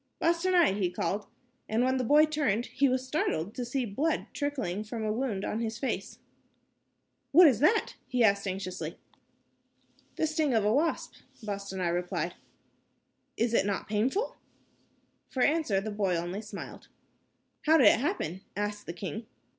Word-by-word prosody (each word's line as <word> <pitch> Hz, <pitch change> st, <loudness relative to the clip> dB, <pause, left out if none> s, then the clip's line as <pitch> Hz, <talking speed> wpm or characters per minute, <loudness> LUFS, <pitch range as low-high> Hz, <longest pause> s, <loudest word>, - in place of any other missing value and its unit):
"Bostanai," 340 Hz, -, +3 dB
he 185 Hz, -3 st, +1 dB
called, 195 Hz, +3 st, -2 dB, 0.4 s
and 225 Hz, +3 st, +2 dB
when 260 Hz, +1 st, +2 dB
the 255 Hz, -, 0 dB
boy 295 Hz, +5 st, +6 dB
turned, 280 Hz, -8 st, 0 dB
he 275 Hz, 0 st, +1 dB
was 255 Hz, 0 st, 0 dB
startled 210 Hz, -, -1 dB
to 250 Hz, -, -4 dB
see 250 Hz, +1 st, -1 dB
blood 285 Hz, +10 st, -1 dB
trickling 255 Hz, -, -2 dB
from 220 Hz, +1 st, -5 dB
a 215 Hz, -, 0 dB
wound 225 Hz, -5 st, -2 dB
on 215 Hz, -, -2 dB
his 225 Hz, -1 st, -3 dB
face. 270 Hz, -, -3 dB, 1.2 s
"What 350 Hz, +4 st, +9 dB
is 250 Hz, -7 st, +3 dB
that?" 410 Hz, -, +3 dB
he 250 Hz, -2 st, +1 dB
asked, 200 Hz, -2 st, +3 dB
anxiously. 185 Hz, -1 st, -4 dB, 1.2 s
"The -, -, +1 dB
sting 310 Hz, -4 st, +1 dB
of 215 Hz, -2 st, +2 dB
a 210 Hz, -, +3 dB
wasp," 315 Hz, +5 st, 0 dB, 0.3 s
Bostanai 200 Hz, -3 st, -3 dB
replied. 175 Hz, 0 st, -2 dB, 1.0 s
"Is 230 Hz, +1 st, +1 dB
it -, -, +4 dB
not 200 Hz, -, -2 dB
painful?" 250 Hz, -, 0 dB, 0.9 s
For 255 Hz, -, 0 dB
answer, 295 Hz, -10 st, +2 dB
the 215 Hz, +2 st, -4 dB
boy 200 Hz, -3 st, 0 dB
only 175 Hz, +4 st, -3 dB
smiled. 215 Hz, -, -9 dB, 0.8 s
"How 320 Hz, +1 st, +7 dB
did 265 Hz, -, +5 dB
it 210 Hz, -, +7 dB
happen?" 240 Hz, -, -2 dB, 0.2 s
asked 205 Hz, 0 st, -3 dB
the 170 Hz, -, -4 dB
king. 215 Hz, +5 st, -6 dB
225 Hz, 155 wpm, -29 LUFS, 200-285 Hz, 1.2 s, What